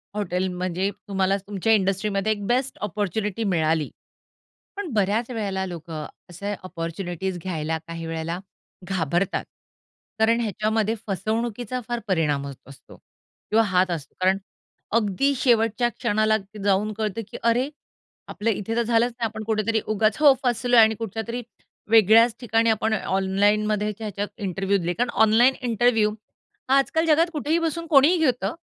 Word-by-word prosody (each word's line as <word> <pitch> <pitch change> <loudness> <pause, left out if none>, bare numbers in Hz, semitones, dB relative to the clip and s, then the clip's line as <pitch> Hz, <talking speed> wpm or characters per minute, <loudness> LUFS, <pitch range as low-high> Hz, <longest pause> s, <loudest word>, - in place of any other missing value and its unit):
Hotel 185 -2 -1
म्हणजे 185 +2 -1 0.2
तुम्हाला 195 0 +1
तुमच्या 205 +2 +1
इंडस्ट्रीमध्ये 195 +1 +1
एक 205 -2 -3
बेस्ट 255 +2 0
अपॉर्च्युनिटी 210 +1 -2
मिळाली. 160 -2 +1 0.9
पण 380 -9 -5
बऱ्याच 215 +3 +1
वेळेला 200 -5 -2
लोकं 165 -3 -6 0.2
असे 200 +4 -4
अपॉर्च्युनिटीज 175 +1 -4
घ्यायला 160 -3 -2
काही 165 -1 -6
वेळेला 165 +1 -3 0.5
घाबरतात. 180 0 -1 0.7
कारण 230 +2 +3
ह्याच्यामध्ये 220 +1 0
फसवणुकीचा 225 +4 -2
फार 240 0 -1
परिणाम 150 -6 +1
होत 140 - -6
असतो 140 - -14
किंवा 225 +1 -3
हात 185 0 +2
असतो 155 -4 -5
कारण 190 +1 +3 0.6
अगदी 230 +6 +1
शेवटच्या 235 -1 +2
क्षणाला 215 -1 +1 0.3
जाऊन 205 +2 +2
कळतं, 215 0 -2
की - - -8
अरे, 240 +4 +2 0.6
आपलं 225 +2 -1
इथे 220 +1 -2
तर 235 - +3
झालंच 235 +1 +2
नाही. 235 -1 -4
आपण 220 0 -6
कुठेतरी 220 0 0
उगाच 215 0 +2
हो, 290 -2 +8
फसलोय 245 -1 +3
आणि 220 0 +5
कुठच्यातरी 225 +2 -4 0.5
वेगळ्याच 225 +1 +6
ठिकाणी 225 -1 +2
आपण 220 0 +1
ऑनलाईनमध्ये 205 +2 +1
ह्याच्यात 205 -1 -3
इंटरव्ह्यू 195 0 0
दिले 175 -1 -1
कारण 240 +3 0
ऑनलाईन 240 +5 +5
इंटरव्ह्यू 225 -2 +2 0.6
हा 270 - +6
आजकाल 320 +4 +1
जगात 330 +2 +4
कुठेही 310 +1 0
बसून 335 0 -2
कोणीही 300 +6 +6
घेतं 245 -9 +1
215 Hz, 140 wpm, -24 LUFS, 190-230 Hz, 0.9 s, हो